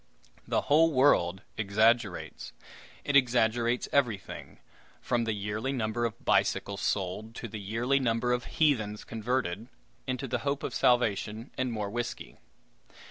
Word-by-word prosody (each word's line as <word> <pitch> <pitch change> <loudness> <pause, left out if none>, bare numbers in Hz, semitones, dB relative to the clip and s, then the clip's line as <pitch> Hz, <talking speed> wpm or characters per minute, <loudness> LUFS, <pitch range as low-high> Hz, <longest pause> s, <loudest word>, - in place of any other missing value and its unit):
The - - +1
whole 160 +3 +4
world 100 - +3
exaggerates. 110 0 +1 0.5
It 145 - -1
exaggerates 120 -2 +3
everything, 120 -8 -1 0.4
from 120 -2 0
the 110 - 0
yearly 105 +5 -3
number 120 -2 -1
of 115 - -5
bicycles 100 -1 +1
sold 105 +4 -2
to 120 - -6
the 110 0 -7
yearly 115 +7 0
number 125 -1 +1
of 125 0 -2
heathens 110 -9 +1
converted 115 -2 -2 0.4
into 130 +1 -2
the 125 0 -1
hope 140 +2 -2
of - - -3
salvation 115 -1 +1
and 130 -1 -1
more 105 -3 -3
whiskey. 120 +1 -5
115 Hz, 135 wpm, -29 LUFS, 105-125 Hz, 0.5 s, whole